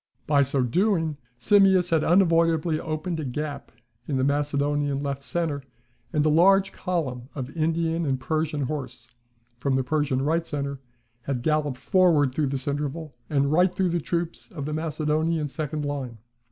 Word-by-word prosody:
By 145 -2 +3
so 135 -1 +1
doing, 165 - +1 0.2
Simmias 190 +2 +4
had 160 -2 +3
unavoidably 165 -3 +3
opened 160 +1 -3
a - - -3
gap 145 +2 -5 0.4
in 140 - -1
the 130 - +1
Macedonian 145 0 0
left 140 -1 -3
centre; 155 -1 -2 0.5
and 150 -3 +1
a - - +4
large 195 +5 +5
column 135 -11 -3
of 135 0 -6
Indian 165 +1 0
and 135 -1 0
Persian 155 +2 -1
horse, 130 -4 -5 0.5
from 135 +1 0
the 130 - +1
Persian 135 -1 0
right 165 +3 +1
centre, 140 -3 -4 0.5
had 130 -3 -2
galloped 150 -3 0
forward 155 -4 +3
through 150 +1 0
this 135 0 -3
interval, 145 +2 -3 0.2
and 140 -2 +1
right 180 +3 +3
through 185 -2 +1
the 175 0 0
troops 170 +5 -3
of 155 -9 -6
the 150 - -3
Macedonian 155 0 0
second 150 0 -4
line. 135 -5 -4
150 Hz, 160 wpm, -25 LUFS, 140-165 Hz, 0.5 s, large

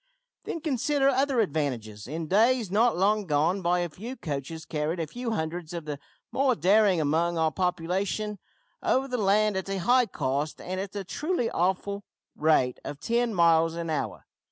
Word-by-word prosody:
"Then, 330 - -4
consider 280 -1 +1
other 270 -2 +2
advantages. 125 - -2
In 160 +4 -4
days 220 +4 +3
not 225 +1 +3
long 205 +2 +2
gone 160 +6 +1
by 175 0 +2
a 175 - -2
few 225 +11 -7
coaches 155 - -5
carried 155 +2 -2
a 165 - 0
few 240 - -5
hundreds 165 -4 -3
of 170 -3 -5
the 145 -2 -5 0.3
more 265 -2 +2
daring 195 +2 +4
among 165 +3 +1
our 160 -1 +2
population 185 +4 -1 0.4
over 265 +1 +1
the 250 -1 -2
land 210 0 +3
at 190 +1 -4
a 195 - -1
high 245 +6 +3
cost 145 -3 -2
and 185 +1 -4
at 195 0 -5
the 200 -1 -4
truly 295 - -1
awful 190 +3 -1 0.3
rate 150 -5 +2
of 145 - -6
ten 235 +5 0
miles 165 -1 +4
an 170 -1 -3
hour. 155 - -3
185 Hz, 175 wpm, -27 LUFS, 160-220 Hz, 0.4 s, daring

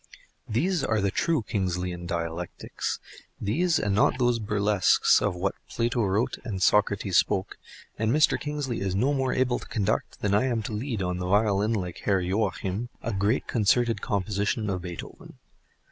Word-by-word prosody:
These 160 - +1
are 110 -4 +1
the 100 -1 +1
true 160 - +1
Kingsleyan 90 -4 -2
dialectics; 85 0 -4 0.4
these, 160 - +1
and 100 -7 0
not 105 +4 +3
those 120 -2 +2
burlesques 105 -2 +3
of 100 -3 0
what 95 +2 -1 0.2
Plato 120 0 0
wrote 100 +4 0
and 105 -7 -4
Socrates 100 -1 +2
spoke, 95 - -1 0.4
and 110 0 +1
Mr. 155 +4 +3
Kingsley 145 -5 -3
is 95 -1 -1
no 130 +9 +2
more 135 -2 0
able 125 -1 +1
to - - -11
conduct 100 -4 -1
than 100 -1 +1
I 105 +5 +3
am 120 -4 0
to 105 - -5
lead 110 -2 -2
on 90 0 -1
the 90 - -3
violin 105 +2 +2
like 90 -5 -3
Herr 100 -2 +1
Joachim, 95 +3 -1
a 115 - -2
great 100 +5 +1
concerted 115 +1 +2
composition 100 +1 -1
of 90 -1 -2
Beethoven. 90 -1 -9
105 Hz, 165 wpm, -27 LUFS, 95-120 Hz, 0.4 s, not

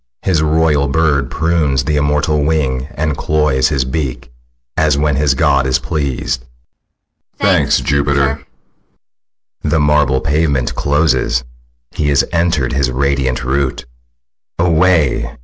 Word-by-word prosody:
His 90 -5 +1
royal 80 -2 +2
bird 70 -2 +1
Prunes 80 -5 0
the 75 +3 -1
immortal 75 +1 +1
wing, 70 -4 -1
and 75 0 -1
cloys 75 -2 +1
his 70 -4 0
beak, 65 -3 -4 0.4
As 75 -2 +2
when 75 -1 +1
his 70 -1 +1
god 70 +1 +2
is 65 - +2
pleas'd. 65 -4 -3 1.0
ALL. - - -1
Thanks, - - +3
Jupiter! 70 -1 +1
SICILIUS. 70 0 -6 1.2
The 80 - 0
marble 75 -2 +2
pavement 70 -4 0
closes, 75 -3 +1 0.5
he 75 - -1
is 70 - +2
enter'd 85 -7 0
His 70 -1 0
radiant 65 -1 -1
roof. 65 +1 0 0.8
Away! 85 -3 +1
70 Hz, 125 wpm, -15 LUFS, 65-75 Hz, 1.2 s, Thanks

